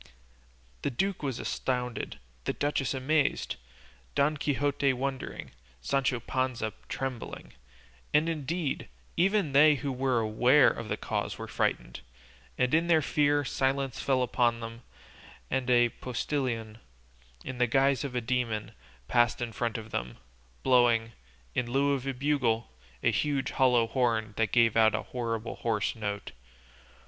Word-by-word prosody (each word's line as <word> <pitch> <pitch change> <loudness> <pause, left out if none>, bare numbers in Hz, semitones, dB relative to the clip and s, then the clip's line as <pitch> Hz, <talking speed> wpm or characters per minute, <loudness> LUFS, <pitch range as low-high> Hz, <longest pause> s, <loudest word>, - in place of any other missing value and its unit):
The - - 0
duke 190 +9 -1
was 135 -5 -2
astounded, 125 -2 -3 0.3
the - - 0
duchess 145 -2 -1
amazed, 145 +3 +1 0.6
Don 145 +2 +3
Quixote 145 -1 +1
wondering, 135 +1 -4 0.3
Sancho 130 - 0
Panza 125 -3 -2 0.2
trembling, 130 -3 -5 0.6
and 150 +2 +3
indeed, 160 - -2 0.3
even 195 -3 +2
they 150 +2 +7
who 140 0 -3
were 130 -1 +1
aware 120 +5 +5
of 110 - -6
the - - -1
cause - - -3
were - - -6
frightened. - - -1 0.6
In 160 +7 +2
their 160 -3 +4
fear, 145 0 +2
silence 135 0 0
fell 130 -2 +2
upon 120 -1 +1
them, 115 0 -7 0.7
and 130 -1 0
a 120 -1 +5
postillion, 120 -3 -3 0.7
in 130 -1 -5
the 125 - +4
guise 135 +3 +3
of 135 -3 -5
a 125 - +1
demon, 115 -3 -1 0.4
passed 120 -1 +3
in 120 -1 -3
front 115 0 -2
of 110 0 -9
them, - - -4 0.5
blowing, 120 -3 +4 0.4
in 120 -1 -1
lieu 140 +2 +3
of 135 -1 -3
a 135 - 0
bugle, 125 - 0 0.3
a - - +4
huge 145 -2 0
hollow 125 -3 +4
horn 115 -3 0
that 115 -3 +1
gave 115 -2 +4
out 110 -1 +5
a - - -2
horrible 115 -2 -4
hoarse 110 -3 -1
note. 105 -2 -4
125 Hz, 140 wpm, -29 LUFS, 115-140 Hz, 0.7 s, they